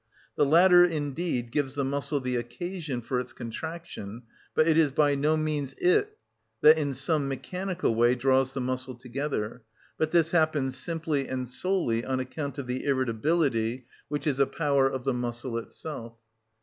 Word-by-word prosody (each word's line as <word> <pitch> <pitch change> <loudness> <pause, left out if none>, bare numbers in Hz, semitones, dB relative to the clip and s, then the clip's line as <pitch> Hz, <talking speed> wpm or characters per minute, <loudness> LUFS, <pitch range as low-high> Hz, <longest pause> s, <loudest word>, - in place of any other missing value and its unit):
The 145 - +3
latter 175 +3 +7
indeed 145 -6 -1
gives 140 0 -1
the 140 - 0
muscle 140 +2 -1
the 125 -1 -2
occasion 135 +3 -4
for 125 +2 -1
its 125 - -6
contraction, 120 - -7 0.3
but 155 - +4
it 160 - +4
is 155 -3 +4
by 145 +1 +3
no 150 +3 +2
means 150 -3 -2
it 180 +6 +2 0.4
that, 155 +1 +7
in 145 -3 -1
some 140 +2 0
mechanical 180 +4 -2
way, 120 +2 +4
draws 130 +1 +2
the 135 - -1
muscle 130 0 -3
together; 125 -2 -4 0.4
but 155 - +1
this 165 -1 +3
happens 155 -6 +2
simply 155 -1 -2
and 130 -1 -3
solely 125 -4 0
on 130 0 -1
account 140 +2 -5
of 140 - -4
the 125 +1 -3
irritability, 130 -2 0 0.2
which 145 -1 -3
is 140 -3 0
a 140 - +4
power 140 -4 +2
of 130 -2 -4
the 135 0 +1
muscle 120 0 -3
itself. 115 -2 -8
135 Hz, 165 wpm, -27 LUFS, 125-155 Hz, 0.4 s, latter